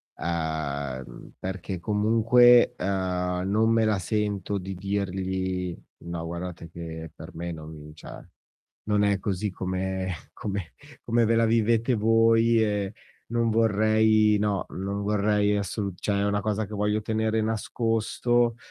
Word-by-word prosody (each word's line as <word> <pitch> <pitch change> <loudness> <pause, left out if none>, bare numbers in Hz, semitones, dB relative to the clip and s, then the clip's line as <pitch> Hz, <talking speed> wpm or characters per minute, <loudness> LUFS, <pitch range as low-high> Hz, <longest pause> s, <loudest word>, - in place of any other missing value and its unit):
uhm, 75 -6 -4
perché 95 0 -5
comunque, 115 +5 +5
ehm, 90 -1 -1
non 110 +3 +3
me 115 -1 +3
la 105 -2 +1
sento 105 0 -1
di 95 0 -5
dirgli: 95 -2 -2 0.3
"No, 85 -1 -4
guardate 85 0 -6
che 80 -2 -7
per 80 - -11
me 85 +1 -4
non 75 -1 -9
cioè 80 - -10 0.7
non 105 -1 +1
è 100 -1 +2
così 100 +1 -2
come 95 0 -3 0.2
come 100 -6 -5 0.3
come 115 0 +2
ve 115 - +2
la 115 - +4
vivete 115 +2 +2
voi 115 +1 +4
e 105 -1 -2 0.3
non 115 0 +1
vorrei, 110 -1 +3
no, 100 -3 0
non 100 +2 -4
vorrei 105 0 +2
assolut", 100 -2 -4
cioè 100 -1 0
è - - +1
una 105 0 +1
cosa 105 +1 -1
che 105 - -8
voglio 105 +1 0
tenere 110 0 0
nascosto, 115 +2 0
100 Hz, 135 wpm, -26 LUFS, 90-110 Hz, 0.7 s, comunque